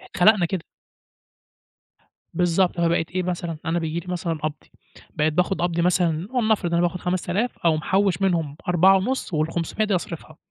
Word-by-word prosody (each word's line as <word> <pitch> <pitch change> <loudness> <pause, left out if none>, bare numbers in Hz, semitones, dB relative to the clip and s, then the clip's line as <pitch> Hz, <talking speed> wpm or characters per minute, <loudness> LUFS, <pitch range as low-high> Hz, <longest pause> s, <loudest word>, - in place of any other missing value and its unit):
اتخلقنا 190 -1 +3
كده. 180 -2 -3 1.7
بالضبط، 175 +1 +1
فبقيت 165 -1 +1
إيه 185 0 -1
مثلًا 170 -2 -3
أنا 165 +2 0
بييجي 160 +1 -2
لي 170 - -12
مثلًا 170 -1 -2
قبضي، 155 -1 -5 0.4
بقيت 155 +1 +1
باخد 180 +3 0
قبضي 170 -1 0
مثلًا 175 -1 +1
ولنفرض 220 -8 +1
أنا 170 - +3
باخد 175 +1 0
5000 185 +6 -1
أقوم 160 -2 +2
محوّش 190 +2 +1
منهم 165 -6 0
4.5 190 +7 +3
وال500 165 +6 -1
دي 205 -3 +1
أصرفها، 165 -3 -6
175 Hz, 150 wpm, -23 LUFS, 165-190 Hz, 1.7 s, اتخلقنا